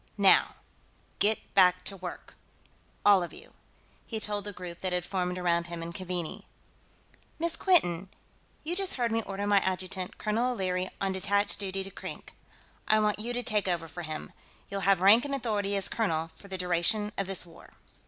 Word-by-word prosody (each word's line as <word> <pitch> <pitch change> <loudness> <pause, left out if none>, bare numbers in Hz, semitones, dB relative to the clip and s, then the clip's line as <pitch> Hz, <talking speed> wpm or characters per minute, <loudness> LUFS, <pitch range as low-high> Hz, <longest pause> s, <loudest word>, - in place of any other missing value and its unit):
"Now, 195 -2 +5 0.6
get 215 +1 +1
back 185 -2 +5
to 200 - -3
work, 180 -2 -8 0.7
all 200 -2 +7
of 175 - -5
you," - - -13 0.5
he 225 - -3
told 205 -1 -2
the 205 - -3
group 180 -2 -8
that 185 - -2
had 180 -1 0
formed 180 -1 -1
around 170 -1 +1
him 170 -1 -5
and 170 0 -6
Keaveney. 180 -3 -4 0.9
"Miss 335 0 +1
Quinton, 190 - +3 0.5
you 335 +3 -2
just 390 0 0
heard 240 -3 0
me 225 0 +2
order 200 -1 -4
my 205 -1 +5
adjutant, 185 0 -3
Colonel 230 +4 0
O'Leary, 185 -3 -1
on 195 -1 0
detached 200 +2 +1
duty 195 -1 -2
to 195 - -8
Krink. - - -8 0.5
I 215 - +5
want 210 -1 +1
you 230 +3 -3
to 245 0 -2
take 210 -4 +1
over 170 -2 -1
for 175 +3 -7
him. 155 -2 -6 0.4
You'll 200 0 -2
have 195 -2 +4
rank 205 +5 +7
and 280 -1 -2
authority 210 -6 -1
as 195 -1 +1
colonel 165 -7 -1
for 200 - -15
the 190 -1 -4
duration 180 +4 +1
of 195 - -2
this 190 -2 -3
war." 170 - -15
195 Hz, 185 wpm, -29 LUFS, 180-210 Hz, 0.9 s, all